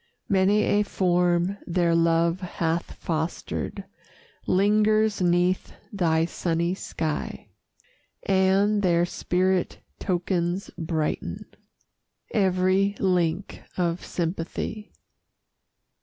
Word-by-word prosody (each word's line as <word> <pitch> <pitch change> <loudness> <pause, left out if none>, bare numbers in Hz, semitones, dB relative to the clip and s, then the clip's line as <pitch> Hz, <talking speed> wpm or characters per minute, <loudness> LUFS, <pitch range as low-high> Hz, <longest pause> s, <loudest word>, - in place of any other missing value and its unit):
Many 200 +2 +3
a 205 - +2
form 180 -1 +1
their 170 -1 +2
love 165 +1 +2
hath 170 -2 -2
fostered 160 0 -3 0.6
Lingers 210 +2 +3
'neath 180 +1 +1 0.2
thy 165 -4 +2
sunny 170 0 -1
sky, 160 -5 -4 0.7
And 195 +2 +3
their 175 -2 +3
spirit 185 +1 0 0.2
tokens 180 0 -1
brighten 160 -2 -3 0.9
Every 190 0 +2
link 180 -1 0 0.2
of 175 -1 -1
sympathy. 175 +5 -4
180 Hz, 80 wpm, -25 LUFS, 170-195 Hz, 0.9 s, Many